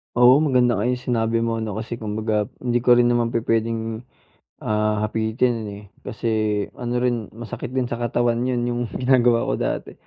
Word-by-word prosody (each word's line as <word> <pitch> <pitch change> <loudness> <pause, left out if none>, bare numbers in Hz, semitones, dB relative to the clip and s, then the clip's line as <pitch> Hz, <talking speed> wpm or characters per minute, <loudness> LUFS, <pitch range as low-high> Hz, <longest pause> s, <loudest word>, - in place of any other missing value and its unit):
Oo, 125 +3 +7
maganda 125 -7 +2
nga 115 - 0
yung 125 - +1 0.2
sinabi 115 0 +1
mo, 115 -1 -1
'no? 110 -3 -4
Kasi 115 +1 -5
kumbaga 105 -1 -1 0.2
hindi 120 -1 +1
ko 120 0 +5
rin 120 0 +4
naman 120 -1 0
pupuwedeng, 115 -1 -1 0.6
ah, 105 0 0
hapitin, 110 +1 0
eh. 100 +1 -8 0.2
Kasi 115 - -4 0.5
ano 120 0 -1
rin 120 -4 0
masakit 120 0 -6
din 130 - +2
sa 120 -1 -4
katawan 120 0 0
'yon 125 -2 0
yung 120 0 -1
ginagawa 125 -2 +3
ko - - -2
dati, - - -2
115 Hz, 175 wpm, -22 LUFS, 110-120 Hz, 0.6 s, Oo